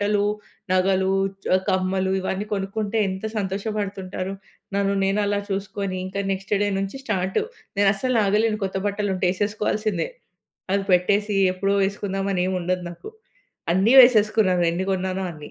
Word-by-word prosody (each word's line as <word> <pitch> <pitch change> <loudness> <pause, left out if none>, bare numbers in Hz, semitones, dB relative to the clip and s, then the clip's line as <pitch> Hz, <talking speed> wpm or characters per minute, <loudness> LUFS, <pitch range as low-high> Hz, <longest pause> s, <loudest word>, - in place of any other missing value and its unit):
బట్టలు, 205 0 +2 0.5
నగలు 190 +1 +2 0.3
చ్ - - -13 0.2
కమ్మలు 190 0 +1
ఇవన్నీ 190 +2 -3
కొనుక్కుంటే, 205 +2 -2
ఎంత 190 +3 -4
సంతోషపడుతుంటారు. 195 -2 -3 0.4
నన్ను 200 0 +1
నేను 195 +2 +1
అలా 205 0 0
చూసుకొని, 195 -1 -3
ఇంకా 200 +1 -4
నెక్స్ట్ 195 +1 -6
డే 205 - +1
నుంచి 195 +5 -3
స్టార్టు. 190 - 0 0.4
నేనస్సలాగలేను 210 +1 +2
కొత్త 190 0 -3
బట్టలుంటే 200 -2 -2
ఏసేసుకోవాల్సిందే. 210 -2 -1 0.6
అవి 200 0 +1
పెట్టేసి 200 +3 +2 0.2
ఎప్పుడో 195 +2 0
వేసుకుందాం 195 0 -2
అని 180 - +1
ఏముండదు 180 -1 -1
నాకు. 430 - -10 0.6
అన్నీ 200 +8 +3
వేసేసుకున్నాను 215 -6 +4
ఎన్ని 185 +3 -2
కొన్నానో 190 0 -2
అన్ని. 150 -1 -11
195 Hz, 130 wpm, -23 LUFS, 190-205 Hz, 0.6 s, వేసేసుకున్నాను